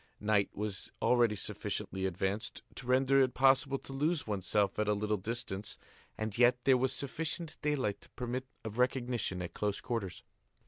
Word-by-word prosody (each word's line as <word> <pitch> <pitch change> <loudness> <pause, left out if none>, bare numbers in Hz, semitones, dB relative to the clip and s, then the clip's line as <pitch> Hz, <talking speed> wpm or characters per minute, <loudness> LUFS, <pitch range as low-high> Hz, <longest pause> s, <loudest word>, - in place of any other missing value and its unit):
Night 105 -1 +2
was 105 -1 -4
already 120 -3 +4
sufficiently 95 -1 -2
advanced 95 +5 -2
to 125 - -7
render 135 +2 +4
it 130 -2 +2
possible 135 +1 +4
to 135 - -9
lose 150 +4 0
oneself 100 0 0
at 105 - +1
a 105 - +3
little 105 +1 0
distance 105 -1 -4 0.4
and 110 -2 -3
yet 125 +1 +6
there 135 -1 +6
was 130 +1 +2
sufficient 160 +3 -3
daylight 135 -9 0
to - - -16
permit 125 +1 -4 0.2
of 110 +2 -5
recognition 120 -7 0
at 85 - -6
close 105 -1 -1
quarters. 115 -7 -3
120 Hz, 165 wpm, -33 LUFS, 105-130 Hz, 0.4 s, yet